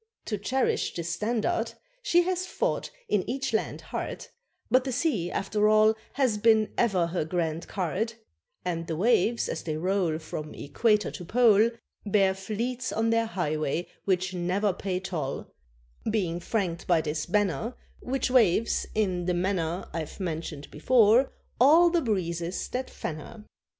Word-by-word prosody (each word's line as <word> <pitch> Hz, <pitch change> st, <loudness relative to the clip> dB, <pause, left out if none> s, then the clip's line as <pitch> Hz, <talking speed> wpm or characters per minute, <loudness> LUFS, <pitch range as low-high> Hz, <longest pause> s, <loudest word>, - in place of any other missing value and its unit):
To 210 Hz, -, -2 dB
cherish 255 Hz, +6 st, 0 dB
this 170 Hz, -1 st, -3 dB
standard 225 Hz, -, -1 dB, 0.3 s
She 350 Hz, -8 st, +4 dB
has 370 Hz, +1 st, -1 dB
fought, -, -, -1 dB, 0.2 s
in 205 Hz, -3 st, +1 dB
each 270 Hz, 0 st, -2 dB
land, 220 Hz, -, -1 dB
hard, -, -, -5 dB, 0.5 s
But 255 Hz, 0 st, +5 dB
the 265 Hz, -, -3 dB
sea, 240 Hz, -, 0 dB
after 210 Hz, +3 st, +1 dB
all, 215 Hz, 0 st, +5 dB, 0.2 s
has 255 Hz, -7 st, +1 dB
been 220 Hz, -1 st, +4 dB
ever 195 Hz, -8 st, +2 dB
her 170 Hz, 0 st, -1 dB
grand 165 Hz, 0 st, -2 dB
card; 200 Hz, +5 st, -2 dB, 0.5 s
And 165 Hz, -1 st, -2 dB
the 160 Hz, -, -2 dB
waves, 230 Hz, +3 st, +2 dB
as -, -, -3 dB
they 155 Hz, -2 st, -3 dB
roll 180 Hz, -2 st, 0 dB
From 155 Hz, -1 st, -7 dB
equator 210 Hz, +9 st, +1 dB
to 180 Hz, -, -7 dB
pole, 225 Hz, +2 st, +5 dB, 0.3 s
Bear 195 Hz, -2 st, +3 dB
fleets 230 Hz, +6 st, -3 dB
on 225 Hz, +1 st, +1 dB
their 230 Hz, 0 st, +2 dB
highway 155 Hz, -4 st, -1 dB, 0.2 s
which 185 Hz, -1 st, +1 dB
never 185 Hz, +3 st, 0 dB
pay 185 Hz, 0 st, -2 dB
toll, 170 Hz, -8 st, -4 dB, 0.6 s
Being 180 Hz, -6 st, 0 dB
franked 175 Hz, -3 st, -2 dB
by 170 Hz, -3 st, +4 dB
this 155 Hz, 0 st, -3 dB
banner, 205 Hz, -, 0 dB, 0.2 s
Which 260 Hz, 0 st, -1 dB
waves, 230 Hz, -3 st, +3 dB
in 185 Hz, -5 st, 0 dB
the 180 Hz, 0 st, +1 dB
manner 175 Hz, -1 st, -1 dB
I've 160 Hz, +1 st, -5 dB
mentioned 160 Hz, -5 st, -4 dB
before, 235 Hz, -, +4 dB, 0.3 s
all 325 Hz, +7 st, +7 dB
the 340 Hz, -1 st, +2 dB
breezes 175 Hz, -, -2 dB
that 255 Hz, +1 st, -3 dB
fan 155 Hz, -, -5 dB
her. 210 Hz, +7 st, -11 dB
200 Hz, 150 wpm, -27 LUFS, 170-230 Hz, 0.6 s, all